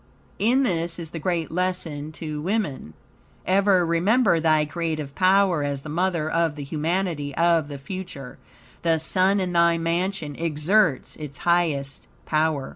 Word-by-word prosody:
In 245 +6 +3
this 170 -6 -1
is 165 -2 -7
the 165 - -5
great 170 0 -2
lesson 165 -4 -2
to 155 -1 -5
woman: 160 - -3 0.5
Ever 190 -1 +3
remember 175 +3 +3
thy 155 -1 +3
creative 155 -3 -4
power 185 -2 +3
as 140 -1 -3
the 155 - -8
mother 175 -2 0
of 165 -1 0
the 145 - -6
humanity 155 -1 -2
of 165 -2 +2
the 145 -1 -7
future. 140 -3 -8 0.4
The 165 -1 +2
sun 185 +5 +3
in 180 -2 -2
thy 170 0 +4
mansion 165 -2 -2
exerts 165 0 +1
its 150 -3 -8
highest 155 -6 0 0.2
power. 155 -3 0
165 Hz, 145 wpm, -24 LUFS, 150-185 Hz, 0.5 s, thy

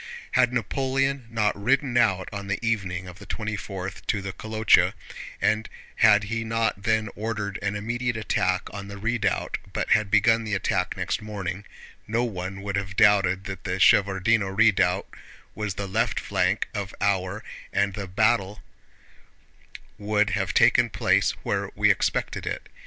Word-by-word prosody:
Had 125 - +3
Napoleon 135 +2 -1
not 110 -2 +1
ridden 125 +5 +1
out 95 -6 +2
on 100 -1 -6
the 100 - -1
evening 95 -5 -1
of 90 +2 -11
the 105 - -11
twenty 105 -1 -3
fourth 95 -2 -6
to 105 - +1
the 95 -1 -5
Kolochá, 110 +2 +3 0.5
and 110 +1 +1 0.3
had 105 -1 +6
he 115 +2 -3
not 115 -3 -1
then 110 +1 +1
ordered 105 -2 -3
an 105 0 -1
immediate 120 +3 -2
attack 95 -4 0
on 100 -1 -7
the 100 0 -8
redoubt 110 -2 -1
but - - -2
had 110 -2 +3
begun 115 +3 +4
the 105 -2 -2
attack 95 -1 -1
next 95 +1 -2
morning, 100 -2 -5 0.4
no 115 +2 0
one 95 -3 -5
would 100 -1 -2
have 95 -1 -4
doubted 95 -3 +4
that 95 -2 -7
the - - -2
Shevárdino 100 +2 +4
Redoubt 100 -4 +3 0.5
was 105 -3 -4
the 100 - -4
left 110 +4 0
flank 95 +1 0
of 100 -2 -5
our 100 0 0
position, - - -12
and 100 0 +1
the 100 -1 -5
battle 105 +1 +1 1.4
would 105 0 +1
have 95 -2 0
taken - - +4
place - - +2
where - - -1
we - - +4
expected - - -1
it. - - -4
105 Hz, 160 wpm, -25 LUFS, 95-110 Hz, 1.4 s, had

